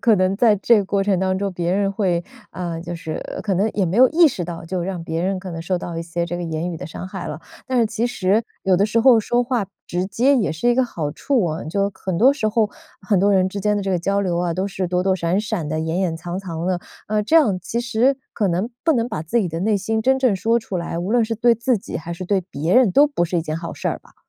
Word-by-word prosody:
可 230 - +4
能 185 0 +1
在 225 -1 +5
这 225 +3 +4
个 200 - 0
过 200 +1 0
程 195 -2 +1
当 185 0 0
中， 200 0 -2
别 175 0 -1
人 200 0 +1
会 185 -4 0 0.3
啊， 175 -2 -4
就 175 +1 -6
是 160 -2 -5 0.2
可 200 -3 0
能 200 +4 +2
也 195 - +1
没 180 +5 -1
有 255 +1 +7
意 335 0 +6
识 185 -10 -4
到， 165 -1 -7
就 175 +1 -3
让 180 -2 -4
别 165 +1 -3
人 190 +1 0
可 185 0 -7
能 165 -1 -5
受 180 +3 -1
到 175 -1 -5
一 - - -3
些 170 +1 -3
这 175 +1 -4
个 175 - -4
言 165 +1 -3
语 170 - -5
的 155 - -7
伤 170 +3 -7
害 - - -6
了。 - - -6 0.3
但 260 -1 0
是 230 - +4
其 225 +2 -1
实， 215 -2 +1 0.2
有 190 -1 +3
的 200 +3 +3
时 225 +2 +1
候 245 -1 +6
说 240 +3 +1
话 240 -4 -1 0.2
直 180 +1 -1
接 250 +8 +3
也 215 - +1
是 160 +10 0
一 240 - +4
个 260 0 +3
好 160 -10 -4
处 250 - 0
哦， 160 -1 -3
就 200 +4 0
很 190 -2 -4
多 255 +9 +6
时 270 -7 -2
候， 215 -1 +1 0.3
很 200 0 +1
多 200 +2 +3
人 190 -1 +3
之 200 - -6
间 210 0 +1
的 205 - -1
这 195 - -2
个 180 - +1
交 200 +3 0
流 180 -3 -1
啊， 175 -1 0
都 190 +3 -1
是 185 -1 -3
躲 180 +1 0
躲 190 0 +2
闪 175 +2 0
闪 210 -8 -3
的、 155 +1 -2
掩 160 +3 -2
掩 175 -4 0
藏 175 +2 -5
藏 170 -4 -5
的， 185 -1 0 0.3
呃， 215 0 +1
这 320 - 0
样 225 - +5
其 235 +6 -3
实 245 +3 +2 0.2
可 210 - 0
能， 185 +7 -1
不 325 - +4
能 235 -3 0
把 155 - -4
自 165 +9 0
己 185 - -1
的 165 +1 -4
内 210 +2 +2
心 220 +3 -1
真 265 +4 +3
正 240 -7 +3
说 230 +4 +1
出 195 - -5
来， 170 -1 -4
无 185 +4 -3
论 240 -1 +3
是 225 +1 -2
对 235 +1 +3
自 235 +2 +1
己 200 - -6
还 170 +2 -6
是 185 +2 -6
对 195 +1 +1
别 165 -2 -3
人 250 -7 +5
都 285 - +6
不 225 -12 0
是 175 +1 -2
一 165 - +1
件 155 -1 -3
好 170 0 -6
事 - - -2
儿 - - -2
吧？ - - -24
190 Hz, 315 characters per minute, -21 LUFS, 175-225 Hz, 0.3 s, 有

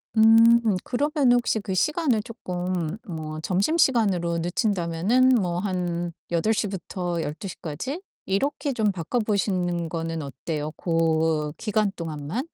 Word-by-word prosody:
음 225 +1 +7 0.2
그러면은 275 -2 +2
혹시 230 -2 0
그 200 -2 -4
시간을 275 - +1
쪼끔 180 -6 -3
뭐 155 -3 -5
점심시간으로 195 - +2
늦춘다면은 180 +6 +1
뭐 180 -8 +1
한 175 -3 -2 0.2
8 195 +7 +2
시부터 180 -4 -3
12 150 +5 -5
시까지 185 - -5 0.3
이렇게 280 +8 -1
좀 220 -4 +1
바꿔 185 +6 -2
보시는 180 -5 0
거는 165 0 -3
어때요 150 +2 -4
고 160 -3 +1
기간 215 -2 0
동안만? 165 - -4
185 Hz, 255 characters per minute, -25 LUFS, 165-225 Hz, 0.3 s, 음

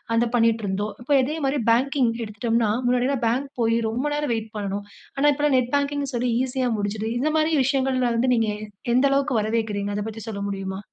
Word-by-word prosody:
அத 230 +1 +3
பண்ணீட்டுருந்தோம். 215 -3 +1
இப்ப 245 - -7
அதே 300 +5 -2
மாதிரி 275 +1 +1
பேங்கிங் 255 0 +2
எடுத்துட்டோம்னா, 225 +1 0 0.2
முன்னாடில்லாம் 250 +1 +1
பேங்க் 260 +5 0
போயி, 230 0 +2
ரொம்ப 245 +5 -2
நேரம் 295 -4 0
வெயிட் 220 -1 -6
பண்ணணும். 200 0 -3 0.3
ஆனா, 285 +2 +3
இப்பல்லாம் 290 -1 +2
நெட் 250 0 -2
பேங்கிங்ன்னு 285 -1 -1
சொல்லி 245 +1 0
ஈசியா 260 0 -1
முடிஞ்சிடுது. 210 +2 -2
இத 295 +5 +1
மாரி 310 +1 +2
விஷயங்கள்ல 260 -1 +1
வந்து 250 +2 +2
நீங்க 225 -1 +1
எ 210 - -8 0.3
எந்த 255 +3 +4
அளவுக்கு 275 -2 +1
வரவேற்கிறீங்க? 210 -2 -1
அத - - -1
பத்தி 225 0 -7
சொல்ல 205 -2 -5
முடியுமா? 195 -1 -4
240 Hz, 185 wpm, -24 LUFS, 220-270 Hz, 0.3 s, எந்த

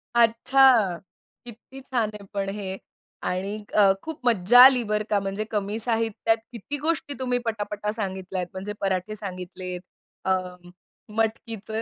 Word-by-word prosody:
अच्छा! 235 -3 +5 0.5
किती 245 +3 -12
छान 240 -5 -1
आहे 210 -1 -9
पण 195 -1 -1
हे 195 -2 -5 0.5
आणि 190 +3 -2 0.2
अ, 200 -2 +6
खूप 320 -1 -6
मज्जा 230 +1 +5
आली 255 -3 +6
बरं 210 0 -1
का, 205 - +3
म्हणजे 195 +2 -3
कमी 210 0 -1
साहित्यात 225 -1 +1
किती 245 +5 -5
गोष्टी 300 -1 -1
तुम्ही 250 -1 0
पटापटा 210 -2 -2
सांगितल्यात. 190 -3 -3
म्हणजे 195 +2 -5
पराठे 195 +2 -1
सांगितलेत. 185 -2 -6 0.4
अ, 190 - +2 0.9
मटकीचं. 225 -1 -2
210 Hz, 130 wpm, -25 LUFS, 195-235 Hz, 0.9 s, अ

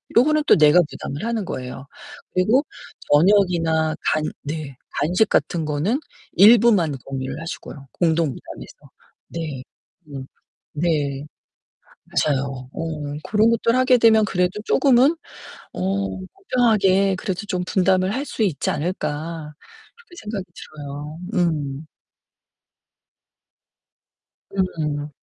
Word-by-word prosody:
요거는 305 +5 +4
또 - - +6
내가 150 +3 +6
부담을 145 +7 -6
하는 230 -2 -1
거에요. 130 -1 -6 0.5
그리고 220 +10 +3 0.5
저녁이나 165 -2 +3 0.2
간 155 - 0 0.2
네. 145 -2 -5 0.2
간식 180 +9 +1
같은 165 -3 0
거는 155 - 0 0.3
일부만 205 -7 +5
공유를 135 +2 -5
하시고요. 150 -4 -8
공동 165 -1 +2
부담해서. 135 - -9 0.5
네. 155 -6 -5 0.5
음. 135 -2 -7 0.5
네. 145 -3 -1 1.0
맞아요. 135 -3 -2
음. 150 -3 -4
그런 215 +2 +3
것들을 230 +1 +2
하게 255 -1 +4
되면 220 -2 +5
그래도 180 +1 -1
조금은 270 +4 +4 0.6
어 195 +1 -1
공정하게 200 - +1
그래도 185 0 -4
좀 180 -3 -2
분담을 185 +1 +2
할 270 +3 -2
수 225 - -3
있지 185 -9 0
않을까 155 -1 -4 0.4
그렇게 460 -7 -18
생각이 210 -3 -5
들어요. 150 +1 -8 0.2
음. 155 -5 -1 2.7
음. 150 -6 -2
175 Hz, 230 characters per minute, -22 LUFS, 150-210 Hz, 2.7 s, 또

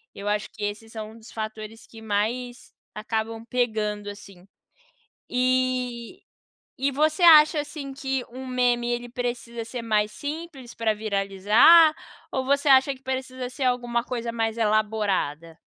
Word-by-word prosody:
eu 200 - -7
acho 210 0 -1
que 215 - -9
esses 210 +2 -4
são 215 -1 -7
um 225 - -14
dos 225 0 -14
fatores 220 0 -7
que 225 - -14
mais 225 +4 -3 0.2
acabam 225 +1 -3
pegando, 215 -4 -1
assim. 195 -2 -12 0.8
E 255 +3 -1 0.6
e 275 +2 +1
você 310 +5 +1
acha, 310 -2 +8
assim, 290 -1 -7
que 270 -1 -3
um 260 +2 -8
meme 245 -1 +1
ele 240 0 -3
precisa 240 -1 -4
ser 240 +1 -6
mais 215 -2 +1
simples 290 -3 -7
pra 225 -1 +1
viralizar, 210 - +5 0.4
ou 260 -1 -2
você 280 +2 +2
acha 270 +1 +5
que 260 - -17
precisa 260 -1 -4
ser 255 +2 -5
alguma 240 -2 0
coisa 235 -2 -4
mais 225 0 -2
elaborada? 210 -8 0
235 Hz, 145 wpm, -25 LUFS, 215-260 Hz, 0.8 s, acha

